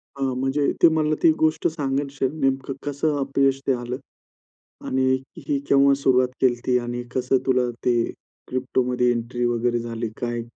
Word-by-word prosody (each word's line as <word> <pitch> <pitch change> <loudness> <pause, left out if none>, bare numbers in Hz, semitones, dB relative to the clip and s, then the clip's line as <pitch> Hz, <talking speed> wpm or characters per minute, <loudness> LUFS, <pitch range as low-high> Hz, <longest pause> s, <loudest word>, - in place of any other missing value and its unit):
अ, 140 - -9
म्हणजे 135 +2 0
ते - - +10
मला 155 -1 +1
ती 165 - +7
गोष्ट 155 0 +2
सांगायचे 140 -3 -1
नेमकं 135 -1 0
कसं 145 +1 0
अपयश 135 0 +1
ते 135 - +4
आलं? 120 0 -4 0.9
आणि 130 0 +1 0.2
ही 140 -3 -2
केव्हा 140 0 +5
सुरुवात 130 -1 +4
केलती? 125 0 +2
आणि 120 0 -4
कसं 130 +1 +2
तुला 125 -2 +2 0.2
ते 120 -2 +3 0.4
क्रिप्टोमध्ये 125 -1 0
एंट्री 120 +1 -2
वगैरे 120 0 +1
झाली 115 -1 -4
काय? 120 -1 -2
130 Hz, 150 wpm, -23 LUFS, 120-140 Hz, 0.9 s, ते